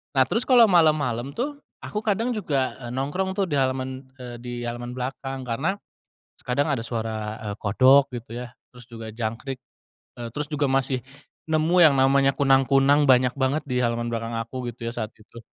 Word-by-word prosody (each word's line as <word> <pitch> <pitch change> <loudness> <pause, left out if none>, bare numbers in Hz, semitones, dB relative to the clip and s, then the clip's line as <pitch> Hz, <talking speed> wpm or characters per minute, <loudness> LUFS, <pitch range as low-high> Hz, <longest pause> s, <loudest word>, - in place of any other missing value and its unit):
Nah 130 - +6
terus 230 - 0
kalo 245 -2 +8
malem-malem 150 -8 +3
tuh, 285 +4 -3 0.2
aku 210 - -3
kadang 220 +2 0
juga 145 - -1 0.2
nongkrong 180 +8 -2
tuh 200 - +2
di 145 - +1
halaman, 130 0 -2
eee, 125 -2 -8
di 125 0 -7
halaman 120 +1 -5
belakang 135 +1 -5
karena 135 +10 -1 0.7
kadang 140 +4 +1
ada 130 -6 -1
suara, 110 -2 -4
eee, - - -3
kodok 130 +6 +4
gitu 120 -1 -7
ya 120 - -12 0.2
terus 125 -1 -13
juga 115 -1 -8
jangkrik, 115 +4 -4 0.6
eee, 120 - -4
terus 150 0 -2
juga 145 -1 +1
masih 135 -1 +1 0.5
nemu 160 +2 +2
yang 155 -5 +7
namanya 135 +1 +3
kunang-kunang 135 +1 +4
banyak 125 -1 +5
banget 135 +4 +1
di 125 -3 -1
halaman 120 -1 -1
belakang 115 0 -3
aku 120 +2 -4
gitu 120 0 -8
ya - - -4
saat 110 -3 -4
itu. 110 +2 -15
130 Hz, 175 wpm, -24 LUFS, 120-145 Hz, 0.7 s, kalo